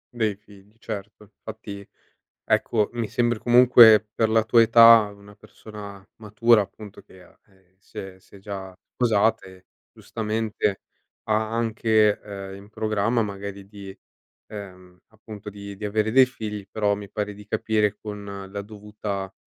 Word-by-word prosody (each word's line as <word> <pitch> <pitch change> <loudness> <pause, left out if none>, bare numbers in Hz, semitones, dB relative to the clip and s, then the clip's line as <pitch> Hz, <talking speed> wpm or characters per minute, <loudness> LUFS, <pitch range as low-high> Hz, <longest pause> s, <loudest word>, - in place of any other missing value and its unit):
Dei 110 -3 0
figli, 105 0 -20
certo. 105 -2 -8 0.2
Infatti, 105 -2 -9 0.6
ecco, 110 -3 +1
mi 115 -2 -3
sembri, 120 0 0
comunque, 120 -3 +6
per 110 -1 +1
la 110 0 +3
tua 115 +1 +4
età, 115 -2 +7
una 100 0 -17
persona 100 -1 -12
matura, 110 +1 +3
appunto, 100 +1 -10
che, 95 -1 -18
ah - - -23
ehm, 95 -1 -30
si - - -18
è 95 -1 -8
si 100 - -20
è - - -14
già 95 -2 -8 0.2
sposate, 105 -5 0 0.3
giustamente, 110 -2 -3 0.4
ha 110 0 -1
anche, 110 -2 +2
ehm, 100 -2 -8
in 100 +1 -14
programma, 110 +1 0
magari 100 -1 -7
di, 100 -2 -10 0.6
ehm, 90 -3 -11
appunto, 110 -1 -11
di 100 0 -9
di 105 - -12
avere 110 +1 0
dei 130 0 +6
figli, 105 -5 -7
però 105 -2 0
mi 100 -1 -9
pare 105 -1 -4
di 105 0 -14
capire, 105 -1 0
con 105 -1 -8 0.3
la 100 0 -5
dovuta, 105 -2 -7
105 Hz, 150 wpm, -24 LUFS, 100-110 Hz, 0.6 s, età